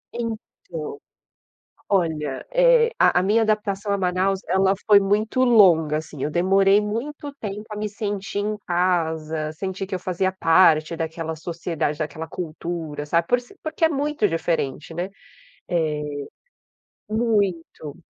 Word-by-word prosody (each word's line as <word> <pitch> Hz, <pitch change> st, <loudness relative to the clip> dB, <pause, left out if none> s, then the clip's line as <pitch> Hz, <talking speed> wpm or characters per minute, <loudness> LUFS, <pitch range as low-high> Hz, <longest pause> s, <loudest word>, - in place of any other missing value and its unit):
Então, 430 Hz, -, -6 dB, 0.9 s
olha, 160 Hz, -8 st, 0 dB
eh, -, -, +5 dB
a 180 Hz, -, +4 dB
a -, -, 0 dB
minha 215 Hz, +4 st, +3 dB
adaptação 210 Hz, -2 st, 0 dB
a -, -, +2 dB
Manaus 185 Hz, +1 st, +1 dB
ela 190 Hz, +1 st, +3 dB
foi 205 Hz, -2 st, +8 dB
muito 210 Hz, +6 st, +1 dB
longa, 170 Hz, -10 st, +5 dB
assim, 155 Hz, -3 st, -8 dB
eu 150 Hz, -, -1 dB
demorei 195 Hz, +4 st, +4 dB
muito 280 Hz, +8 st, -4 dB
tempo 210 Hz, -2 st, -5 dB
a 210 Hz, -, -5 dB
me 210 Hz, 0 st, -2 dB
sentir 200 Hz, -1 st, -4 dB
em 210 Hz, +1 st, -2 dB
casa, 160 Hz, -3 st, 0 dB
sentir 190 Hz, +4 st, -4 dB
que 190 Hz, -, -5 dB
eu 185 Hz, -, -1 dB
fazia 185 Hz, +1 st, -1 dB
parte 165 Hz, -2 st, +4 dB
daquela 160 Hz, 0 st, -4 dB
sociedade, 165 Hz, -2 st, -3 dB
daquela 155 Hz, +1 st, -4 dB
cultura, 160 Hz, -3 st, -5 dB
sabe? 170 Hz, +2 st, +1 dB
Por 245 Hz, 0 st, +3 dB
ser 250 Hz, +11 st, -18 dB
porque 315 Hz, +1 st, -1 dB
é -, -, +6 dB
muito 290 Hz, -6 st, 0 dB
diferente, 165 Hz, -3 st, -2 dB
né? 175 Hz, +3 st, -3 dB, 0.6 s
Eh, 150 Hz, -3 st, -1 dB, 0.9 s
muito. 200 Hz, -9 st, -1 dB
190 Hz, 140 wpm, -23 LUFS, 160-215 Hz, 0.9 s, foi